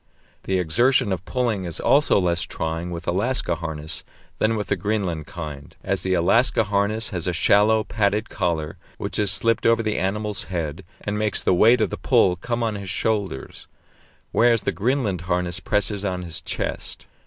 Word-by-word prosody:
The 95 - +1
exertion 120 +7 +2
of 95 -1 -2
pulling 115 -4 -1
is 85 -2 -5
also 145 -6 +4
less 85 -3 +1
trying 80 +2 -3
with 85 -1 -6
Alaska 100 +3 0
harness 80 -2 -5 0.4
than 110 +1 +2
with 105 - -2
the 100 - +2
Greenland 90 -5 -2
kind, 75 -5 -8
as - - -1
the 95 0 +1
Alaska 115 +7 +3
harness 105 +2 0
has 90 -4 -3
a 90 - 0
shallow, 105 +5 +4
padded 105 +1 0
collar, 85 -3 -2 0.2
which 100 0 -3
is 105 -2 +2
slipped 115 +5 +2
over 115 0 +3
the 110 -1 -1
animal's 105 +2 -2
head 85 -4 -4 0.2
and 105 0 -2
makes 105 -1 0
the - - +3
weight 115 +6 +5
of 105 - +1
the - - -3
pull 90 - +3
come 120 +6 -3
on 110 -1 0
his 100 -2 -6
shoulders, 100 -9 -2 0.6
whereas 115 -2 +3
the - - 0
Greenland 110 -5 0
harness 90 -1 +1
presses 105 -1 -1
on 90 -2 -2
his 85 -2 -6
chest. - - -4
100 Hz, 175 wpm, -23 LUFS, 85-110 Hz, 0.6 s, weight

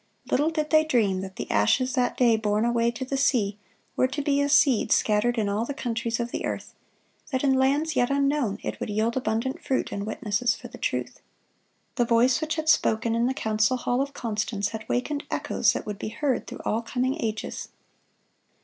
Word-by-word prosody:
Little 295 +4 +3
did 310 -2 -2
they 310 0 +6
dream 220 -11 +1
that 190 0 -7
the - - -5
ashes 255 - +2
that 250 -2 0
day 240 -3 +4
borne 215 0 0
away 235 0 +2
to 240 +2 -5
the 275 +1 -2
sea 215 -7 +1 0.4
were 255 - +3
to 290 +2 -4
be 285 0 +2
as 285 0 +1
seed 260 -6 +4
scattered 225 +3 +2
in 215 -2 +1
all 205 +2 0
the 275 +4 -4
countries 230 -2 -2
of 235 0 -3
the - - -3
earth; - - -4 0.6
that 260 -2 -1
in 270 -2 +4
lands 280 +4 +2
yet 245 -1 +2
unknown 275 -6 +1
it - - -4
would - - -4
yield 220 +3 0
abundant 250 +1 -2
fruit 265 - -1
in 200 - -3
witnesses 220 +2 0
for - - -10
the - - -12
truth. - - -3 0.8
The 240 - +3
voice 240 +4 +3
which 315 +1 -1
had 315 -1 -3
spoken 230 -6 +3
in 235 +1 +2
the 260 - -1
council 220 +3 +1
hall 245 +1 0
of 280 +1 -4
Constance 215 -2 -2
had 220 0 -8
wakened 285 +4 -1
echoes - - +1
that - - -4
would 210 -1 -5
be - - -4
heard 265 +3 -1
through - - -8
all 225 - 0
coming 260 +5 -2
ages. 220 -1 -4
240 Hz, 205 wpm, -26 LUFS, 220-275 Hz, 0.8 s, they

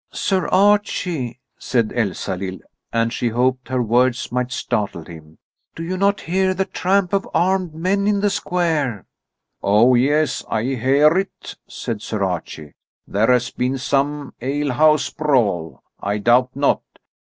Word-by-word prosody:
"Sir 190 -3 0
Archie," 185 - +1 0.2
said 115 -4 0
Elsalill, 95 -4 -2 0.3
and 115 0 0
she 120 - -1
hoped 125 +2 0
her 130 -1 0
words 120 +2 +1
might 125 0 -1
startle 100 -8 -2
him, 80 -2 -13 0.4
"Do 165 - -6
you 180 +3 -3
not 200 +1 +1
hear 185 +2 0
the 190 +1 0
tramp 190 0 0
of 195 0 0
armed 180 -1 +1
men 195 +5 0
in 205 -1 +2
the 205 0 +1
square?" 155 - -1 0.6
"Oh, 110 +5 +4
yes, 145 +5 +2
I 110 -1 0
hear 135 +5 +3
it," 195 - -6
said 110 -3 -5
Sir 110 -2 -3
Archie; 80 -5 -4 0.3
"there 110 +5 +2
has 125 -1 +2
been 130 +2 -1
some 140 +2 -1
alehouse 145 +3 +2
brawl, 110 - 0 0.2
I 100 +1 -2
doubt 125 +4 +2
not. 140 +1 +2
130 Hz, 140 wpm, -20 LUFS, 115-170 Hz, 0.6 s, Oh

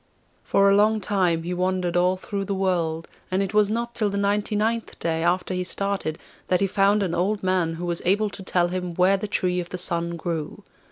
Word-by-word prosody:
For 200 0 +3
a 200 - +5
long 215 +2 +4
time 180 -5 +1
he 175 +2 -3
wandered 180 -1 -1
all 180 +1 +3
through 200 0 -4
the 200 0 -2
world, 170 -4 -1 0.2
and 185 +1 +1
it 195 +1 -4
was 210 -1 +4
not 235 +2 -2
till 220 -3 0
the 200 - -3
ninety 205 +1 0
ninth 225 +2 -1
day 165 -1 -1
after 180 +2 +1
he 180 0 -1
started 195 -4 -2 0.3
that 180 - +2
he 200 - +2
found 200 +1 +3
an 180 -3 -2
old 195 +4 0
man 180 -3 +1
who 175 +2 -5
was 170 -1 -2
able 205 +3 +2
to 195 - -9
tell 175 -2 +1
him 180 -1 -4
where 185 +3 +4
the 210 - -4
Tree 180 -2 0
of 175 -1 -5
the 185 - -5
Sun 170 -1 -2
grew. 165 -3 -4
185 Hz, 225 wpm, -24 LUFS, 175-200 Hz, 0.3 s, a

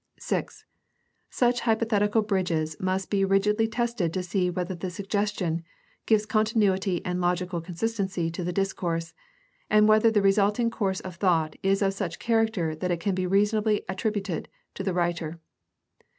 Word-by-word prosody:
(6) - - -4 0.6
Such 245 -1 +2
hypothetical 220 -2 +2
bridges 180 -6 -1
must 185 0 -2
be 200 -1 +2
rigidly 210 +3 +2
tested 230 -7 -1
to 185 +1 -2
see 180 0 0
whether 180 +1 -3
the 180 +1 -5
suggestion 195 -3 -2 0.4
gives 215 -1 +3
continuity 205 -4 +1
and 180 0 -1
logical 175 0 0
consistency 185 -1 -2
to 175 +2 -5
the 180 - -2
discourse, 175 -3 -2 0.6
and 210 0 +5
whether 215 +1 +5
the 210 -2 +2
resulting 205 +4 +3
course 195 -5 -1
of 185 -2 -8
thought 165 -5 +1
is 195 +1 +2
of 195 0 +1
such 195 -4 -4
character 220 -8 +1
that 180 +4 -3
it 175 -2 0
can 200 +2 -1
reasonably 205 +3 +2
be - - -30
attributed 195 -3 -2 0.2
to - - -6
the 190 -1 -1
writer. 170 -2 -1
195 Hz, 150 wpm, -26 LUFS, 180-210 Hz, 0.6 s, and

